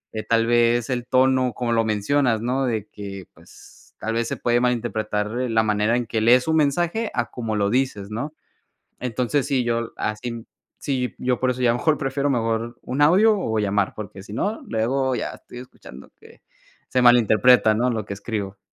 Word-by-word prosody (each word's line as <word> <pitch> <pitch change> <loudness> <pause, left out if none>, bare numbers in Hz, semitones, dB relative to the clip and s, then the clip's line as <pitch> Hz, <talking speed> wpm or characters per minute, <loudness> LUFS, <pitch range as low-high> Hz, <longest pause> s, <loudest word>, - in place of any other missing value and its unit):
eh, 110 - -2
tal 115 0 +2
vez, 120 +1 +2
el 120 -1 -2
tono, 130 -1 +2
como 120 +1 -2
lo 115 -1 +2
mencionas, 110 +2 +1
¿no?, 130 +3 0
de 110 -4 -2
que, 100 -2 -8
pues, - - -19
tal 110 - -3
vez 115 0 -1
se - - -4
puede 120 0 +1
malinterpretar, 110 -2 -1
eh, 125 - -2
la 110 0 +2
manera 105 +2 +1
en 120 - -2
que 110 -1 -2
lees 125 +5 +4
un 160 0 +2
mensaje, 175 +9 +1
a 120 -2 -2
como 115 -3 -3
lo 100 -1 +1
dices, 115 -5 -1
¿no?, 145 +8 -4 0.7
entonces 125 +3 -1
sí, 130 -3 +1
yo 115 -1 -2
así 115 +2 -4 0.3
sí, 130 -3 -2
yo 125 -1 0
por 130 -1 +1
eso 125 0 -5
ya 120 -1 +3
mejor 150 +5 +1
prefiero 140 0 -1
mejor, 115 -1 -1
un 130 +3 -3
audio 195 +9 +5
o 110 -11 -2
llamar, 100 -1 0
porque 100 -2 -8
si 105 - -10
no, 205 - -2
luego 130 +4 0
ya 115 - -3
estoy 125 - -12
escuchando 70 - -13
que - - -18 0.5
se 125 - +1
malinterpreta, 120 -1 +5
¿no?, 120 +4 +1
lo 110 -4 -2
que 100 - -5
escribo. 100 -1 -5
120 Hz, 190 wpm, -22 LUFS, 110-130 Hz, 0.7 s, audio